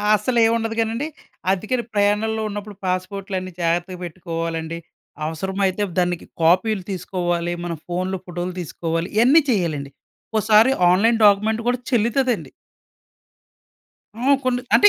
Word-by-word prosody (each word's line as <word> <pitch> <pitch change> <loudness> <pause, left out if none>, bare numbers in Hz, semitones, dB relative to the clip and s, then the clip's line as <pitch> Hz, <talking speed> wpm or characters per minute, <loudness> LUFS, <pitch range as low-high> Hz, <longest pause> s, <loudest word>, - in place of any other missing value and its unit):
అస్సలేముండదు 225 0 +1
గానండి, 225 +6 0 0.4
అద్దికని 220 +6 -1
ప్రయాణంలో 210 +2 +1
ఉన్నప్పుడు 205 0 -6
పాస్పోర్ట్‌లన్నీ 185 0 -3
జాగర్తగా 175 +2 0
పెట్టుకోవాలండి. 165 -1 -4 0.5
అవసరమైతే 190 +5 -1 0.2
దానికి 175 -1 0 0.2
కాపీ‌లు 185 +4 +3
తీసుకోవాలి, 175 -2 -2
మన 170 - -2
ఫోన్‌లో 185 +2 -2
ఫోటోలు 175 0 -4
తీసుకోవాలి, 165 +1 -3
ఇయన్నీ 260 +8 +6
చేయాలండి. 155 - -1 0.4
ఒక్కోసారి 220 +3 +4 0.2
ఆన్లైన్ 225 +5 +3
డాక్యుమెంట్ 215 +3 +4
కూడా 245 0 +1
చెల్లుతదండి. 240 +1 +1 1.7
హ్మ్. 270 +3 +4
కొన్ని, 250 -1 +1
అంటే 415 - +8
195 Hz, 105 wpm, -22 LUFS, 175-225 Hz, 1.7 s, అంటే